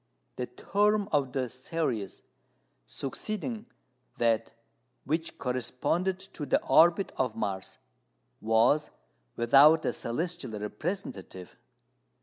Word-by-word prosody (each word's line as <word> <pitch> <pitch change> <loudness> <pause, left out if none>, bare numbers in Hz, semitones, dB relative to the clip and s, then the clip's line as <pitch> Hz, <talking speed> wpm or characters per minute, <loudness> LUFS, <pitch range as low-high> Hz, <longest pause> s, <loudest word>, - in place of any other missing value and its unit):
The - - -3
term 210 0 +1
of 140 -4 +1
the 130 -1 -1
series 130 -5 -3 0.6
succeeding 215 - -4 0.5
that 115 -1 +1 0.5
which 160 +4 -2
corresponded 130 +9 -1
to 180 -6 -7
the - - +3
orbit 170 +7 +5
of 125 -4 0
Mars 100 -4 -4 0.6
was 115 +7 +3 0.5
without 140 +7 +6
a - - +1
celestial 135 -4 -3
representative. 105 - -5
135 Hz, 95 wpm, -29 LUFS, 115-175 Hz, 0.6 s, without